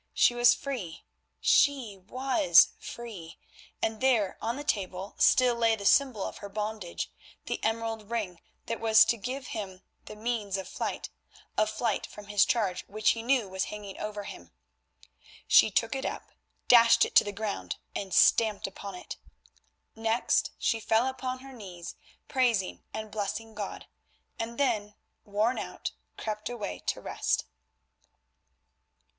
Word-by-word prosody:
She - - +5
was 240 0 +6
free! 235 - -5 0.4
She 275 -8 +3
was 260 - +4
free! 205 -9 -8 0.5
and 220 +1 -1
there 235 -7 +3
on 230 +1 -1
the 290 - -5
table 195 -7 -2
still 250 -1 +5
lay 230 -1 +3
the 200 -2 -8
symbol 255 -4 +4
of - - -5
her 200 - -8
bondage, 210 -3 -4 0.3
the - - -4
emerald 225 -1 -2
ring 205 -7 -3 0.3
that 230 - -3
was 220 -1 +6
to 235 - +2
give 255 +4 -5
him 190 -3 -6 0.2
the - - -9
means 215 -3 -2
of 190 - -5
flight, - - -4 0.4
a 215 - +3
flight 215 0 -1
from 210 - -11
this 205 -1 +4
charge 200 -6 0
which 215 +1 +2
he 230 - -3
knew 245 -2 +2
was 190 0 -2
hanging 205 -2 -8
over 210 -1 -4
him. 85 - -10 0.9
She - - +6
took 225 +3 +1
it 265 0 -3
up, - - -5 0.4
dashed 230 -1 +7
it - - -8
to - - +8
the 205 - -4
ground 205 0 -4 0.2
and 195 -2 -4
stamped 215 +3 +4
upon 195 0 -7
it. 180 - -8 0.8
Next 225 +1 +1
she 225 - +1
fell 225 +2 +2
upon 255 -1 -3
her 270 0 -11
knees, 185 -7 -8 0.3
praising 235 -8 +1
and 215 0 -6
blessing 220 +1 -4
God, - - -6 0.5
and 230 +1 -4
then, 215 -7 0 0.3
worn 215 +4 +1
out, - - -5 0.3
crept 215 0 -4
away 210 - -5
to - - -1
rest. - - -1
220 Hz, 150 wpm, -29 LUFS, 200-240 Hz, 0.9 s, to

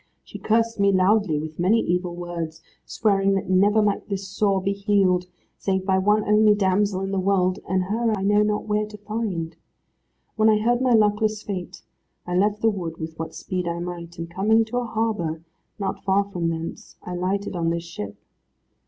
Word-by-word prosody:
She - - -10
cursed 230 0 +1
me 200 0 +4
loudly, 190 -3 +3
with 155 +1 -6
many 195 +6 +3
evil 180 0 -1
words, 170 -2 -5 0.2
swearing 195 -3 +2
that 190 -1 -2
never 205 +3 +4
might 205 +1 -1
this 195 -1 -3
sore 195 0 +1
be 195 +1 -1
healed, 195 -3 +2 0.3
save 190 -1 -1
by 190 -1 +2
one 210 +2 +3
only 210 0 +5
damsel 195 0 +1
in 195 0 -3
the 195 - 0
world, 185 -1 +1
and 185 -1 +1
her 225 +5 0
I 190 - -3
know 205 +1 +4
not 210 0 0
where 210 0 0
to 210 0 -11
find. 205 -6 -4 0.8
When 220 0 +5
I 215 - +5
heard 240 +3 +1
my 255 -2 +3
luckless 215 0 +2
fate 185 -4 -6 0.4
I 180 - -3
left 205 +3 +1
the 225 - +5
wood 170 -5 -5
with 160 0 -7
what 160 0 -5
speed 180 -2 -3
I 170 0 -2
might, 170 -1 -6
and 165 0 -5
coming 210 +6 +2
to 235 +3 -4
a 245 - -3
harbour, 210 -9 -2 0.3
not 200 - -3
far 195 +1 +3
from 180 -4 -3
thence, 165 0 -6
I 180 - -6
lighted 190 +3 -2
on 165 -1 0
this 170 0 -2
ship. 105 -13 -7
195 Hz, 195 wpm, -24 LUFS, 175-210 Hz, 0.8 s, only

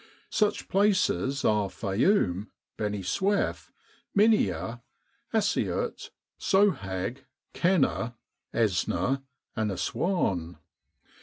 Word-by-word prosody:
Such 210 -1 +1
places 190 -8 +2
are 105 -2 +2
Fayoum, 100 - +1 0.3
Beni 105 -2 -2
Suef, 190 - 0 0.5
Minia, 120 - +2 0.5
Assiut, 215 -2 0 0.3
Sohag, 120 - +1 0.3
Kena, 150 -9 +1 0.4
Esna, 110 +3 +1 0.3
and 110 -2 0
Assuan. 95 - -1
120 Hz, 70 wpm, -28 LUFS, -, 0.5 s, places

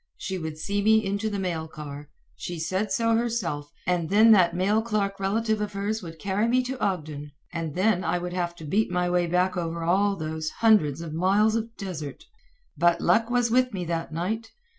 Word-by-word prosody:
She 190 -1 -4
would 160 -2 -5
see 200 +6 -1
me 220 +1 +4
into 200 +3 -1
the 205 - -3
mail 170 -4 -2
car 150 -2 -9 0.3
she 175 - -6
said 185 +5 -2
so 230 +3 +2
herself 225 -11 -2
and 175 -2 0
then 215 +3 +6
that 175 -5 +5
mail 200 +5 +2
clerk 205 -3 -1
relative 215 +2 0
of 210 0 -3
hers 205 +3 -2
would 165 -3 -9
carry 200 +7 0
me 255 +2 +2
to 255 +1 -5
Ogden. 155 -7 -3 0.2
And 165 -3 -4
then 185 0 +2
I - - 0
would 175 0 -4
have 175 -1 -2
to 160 - -10
beat 205 +9 +1
my 180 0 0
way 175 -1 +2
back 180 +2 +1
over 170 -1 -3
all 195 +4 +2
those 155 -2 -3
hundreds 165 -11 +3
of 165 -2 -6
miles 200 +6 +3
of 230 0 -3
desert. 160 -8 -6 0.5
But 175 0 +3
luck 230 +1 +3
was 245 -1 +1
with 250 -2 +2
me 180 -2 -3
that 165 -1 -3
night. 215 +8 -3
185 Hz, 205 wpm, -26 LUFS, 165-215 Hz, 0.5 s, then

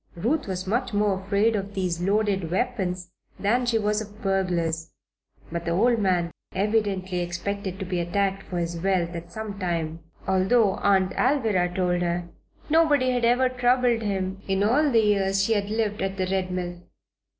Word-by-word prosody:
Ruth 240 - 0
was 185 -1 -3
much 230 +2 -1
more 205 -2 +1
afraid 200 +3 +2
of 200 0 -4
these 180 -3 -1
loaded 195 -2 +1
weapons 185 -4 -2 0.3
than 240 +5 +1
she 235 -2 +3
was 210 0 0
of 210 0 -10
burglars. 170 -4 0 0.6
But 170 0 -4
the 170 - 0
old 230 +5 +3
man 180 -4 +1 0.2
evidently 195 -3 0
expected 190 +2 -3
to 190 - -4
be 180 -1 -2
attacked 195 +3 0
for 180 - -4
his 170 0 -2
wealth 185 -2 +1
at 170 0 -7
some 215 -2 -6
time 165 -3 -2 0.3
although, 190 +3 +3
Aunt 190 -2 +3
Alvirah 220 -10 +1
told 180 -1 +1
her, 175 0 -1 0.4
nobody 295 -5 +3
had 245 -1 +1
ever 250 +2 +4
troubled 250 -1 +2
him 195 -2 -2
in 195 0 +1
all 280 +8 +3
the 230 -4 +4
years 195 -2 +2
she 225 - +2
had 205 -1 -1
lived 215 -1 -1
at 195 0 -2
the 185 - 0
Red 190 0 -1
Mill. 175 -1 -4
195 Hz, 170 wpm, -25 LUFS, 180-220 Hz, 0.6 s, ever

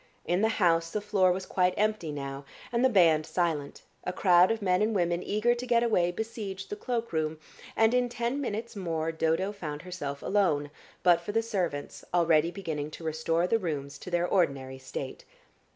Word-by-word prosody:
In 175 +3 +1
the 220 - +4
house 165 -6 +2
the 210 - -2
floor 200 -3 +2
was 185 +1 -2
quite 180 -1 +1
empty 210 -6 0
now 140 -1 -5 0.3
and 235 +1 +1
the 260 - +6
band 165 -8 +5
silent, 155 -4 -2 0.2
a - - -2
crowd 180 -1 +5
of 225 0 0
men 185 -2 +2
and 215 +1 +1
women 175 -2 +1
eager 215 +5 +1
to 240 +1 -5
get 235 -1 +3
away 180 -7 +2
besieged 200 -2 -5
the - - -2
cloakroom, 190 -10 -2 0.4
and 225 +1 +4
in 250 -1 +2
ten 240 +4 -2
minutes 230 -2 -4
more 165 -4 -2
Dodo 165 +4 0
found 155 -7 -6
herself 145 -6 -5
alone, 150 -8 +1 0.3
but 175 -2 +5
for 205 +4 -5
the 225 +1 +2
servants 180 -10 -3
already 165 -2 +4
beginning 160 -6 -4
to 160 - -10
restore 160 +2 0
the 225 +5 +2
rooms 145 -7 -4
to - - -8
their 175 0 +1
ordinary 135 -8 0
state. 130 0 -6
180 Hz, 185 wpm, -29 LUFS, 160-210 Hz, 0.4 s, the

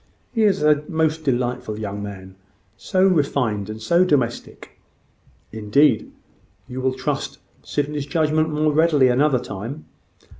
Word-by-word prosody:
He 225 -3 +2
is 195 -7 +2
a 150 -1 +3
most 160 -1 0
delightful 125 -4 -1
young 105 -1 -5
man 95 -2 -8 0.4
so 185 +9 +1
refined! 130 - 0
and 110 0 -6
so 170 +11 +3
domestic!" 130 -9 -2 0.7
"Indeed! 110 +3 +2 0.6
You 130 0 -6
will 130 0 0
trust 130 - -3 0.2
Sydney's 145 0 -3
judgment 155 +1 +1
more 155 0 +1
readily 150 -4 +4
another 135 +2 +3
time." 120 +5 -7
140 Hz, 125 wpm, -21 LUFS, 110-155 Hz, 0.7 s, readily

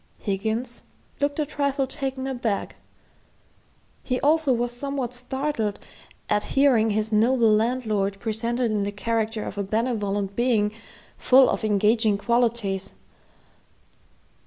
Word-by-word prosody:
Higgins 220 +5 -3 0.4
looked 285 0 0
a 305 - 0
trifle 280 -2 -1
taken 265 0 -4
aback. 245 -6 -2 1.3
He 250 -1 -2
also 310 -1 +3
was 240 -1 0
somewhat 260 0 -4
startled 250 -4 -2 0.5
at 210 0 0
hearing 250 -6 +4
his 215 +1 -1
noble 225 +1 +4
landlord 215 -3 0
presented 230 +2 -1
in 210 -1 0
the 200 0 -2
character 225 +1 -2
of 205 - -6
a - - 0
benevolent 205 -2 -1
being, 230 -3 +2 0.5
full 260 +1 +6
of - - -3
engaging 215 +1 +3
qualities. 230 -4 0
230 Hz, 115 wpm, -24 LUFS, 210-255 Hz, 1.3 s, full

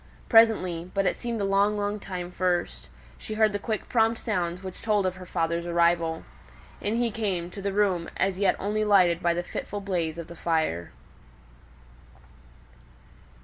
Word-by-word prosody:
Presently, 185 -7 +4
but 195 0 +2
it - - +2
seemed 235 -3 -4
a - - +1
long 200 +2 +2
long 205 +1 -2
time 180 -3 -6
first, 180 -1 -1 0.3
she 215 - -6
heard 215 -1 +3
the 205 - -1
quick 215 +1 -3
prompt 225 -1 +2
sounds 180 -4 -2
which 185 -1 -8
told 210 -3 +1
of 185 0 -1
her 185 -1 -10
father's 170 0 -1
arrival. 170 -1 +2 0.6
In 210 +2 -1
he 235 -1 +1
came 190 -5 -2
to 200 - -8
the 200 0 -1
room 190 -4 +1
as 190 0 0
yet 200 -2 +3
only 210 +2 -1
lighted 185 -5 +4
by 170 -1 +2
the 175 - -2
fitful 205 +3 -5
blaze 175 -5 -2
of 170 - -5
the 170 - -11
fire. 160 - -1
190 Hz, 170 wpm, -26 LUFS, 170-210 Hz, 0.6 s, Presently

